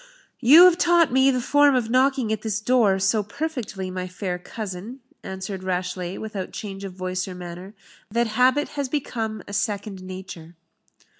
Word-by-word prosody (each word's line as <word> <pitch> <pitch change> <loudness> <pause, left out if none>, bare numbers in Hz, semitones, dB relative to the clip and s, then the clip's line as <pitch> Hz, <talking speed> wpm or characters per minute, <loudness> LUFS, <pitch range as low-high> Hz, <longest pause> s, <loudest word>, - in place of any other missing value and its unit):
"You 285 +8 +8
have 360 -1 +5
taught 345 -6 +4
me 265 +1 +5
the 255 -2 +1
form 290 +2 +4
of 230 -3 0
knocking 260 -3 +2
at 215 - -3
this 215 -1 -2
door 220 -4 +3
so 195 +3 +2
perfectly, 220 -6 -5
my 185 0 -4
fair 180 -1 -4
cousin," 215 +6 -7 0.2
answered 190 0 -6
Rashleigh, 180 0 -3
without 210 -4 -5
change 195 -2 -7
of 195 -2 -6
voice 185 0 -3
or 185 - -7
manner, 180 +3 -9 0.3
"that 235 +3 +1
habit 250 +6 +2
has 280 -2 -3
become 225 -6 -3
a 205 - -8
second 205 -2 -2
nature." 185 -3 -9
210 Hz, 165 wpm, -24 LUFS, 185-255 Hz, 0.3 s, You